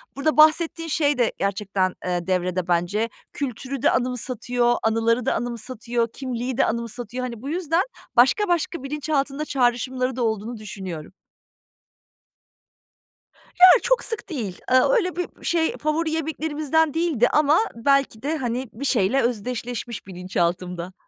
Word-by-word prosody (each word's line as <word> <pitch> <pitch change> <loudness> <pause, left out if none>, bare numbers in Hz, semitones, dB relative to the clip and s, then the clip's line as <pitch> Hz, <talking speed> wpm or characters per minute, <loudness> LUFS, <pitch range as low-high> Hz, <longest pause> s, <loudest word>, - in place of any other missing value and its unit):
burada 280 0 0
bahsettiğin 325 +1 +4
şey 290 -2 +2
de 240 -3 +2
gerçekten, 195 -1 0
eee, 175 -1 -2
devrede 180 -1 0
bence. 180 +6 0 0.2
Kültürü 270 -1 -4
de - - +4
anımsatıyor, 245 -1 0
anıları 225 +2 +1
da - - +2
anımsatıyor, 235 0 -2
kimliği 250 -1 -4
de - - +4
anımsatıyor. 235 +1 -3
Hani, 235 -3 -5
bu 275 - -5
yüzden 335 +1 +1 0.3
başka 265 - +4
başka 340 -3 -1
bilinçaltında 290 0 -2
çağrışımları 255 -1 0
da 250 - -1
olduğunu 220 +1 -2
düşünüyorum. 190 -7 -7 2.5
Ya, 365 - +11 0.2
çok - - +2
sık 450 -3 -2
değil. 225 - -4
Eee, 255 0 +7
öyle 415 -9 +2
bir, 360 - -6
şey, 330 -2 +1
favori 310 +1 -1
yemeklerimizden 315 -1 0
değildi 320 -8 +2
ama 300 +1 +4 0.2
belki 275 -1 +1
de, 310 +3 -1
hani, 250 -1 -3
bir 265 +6 -5
şeyle 245 0 +2
özdeşleşmiş 240 -1 -3
bilinçaltımda. 180 -1 -2
250 Hz, 130 wpm, -23 LUFS, 220-300 Hz, 2.5 s, Ya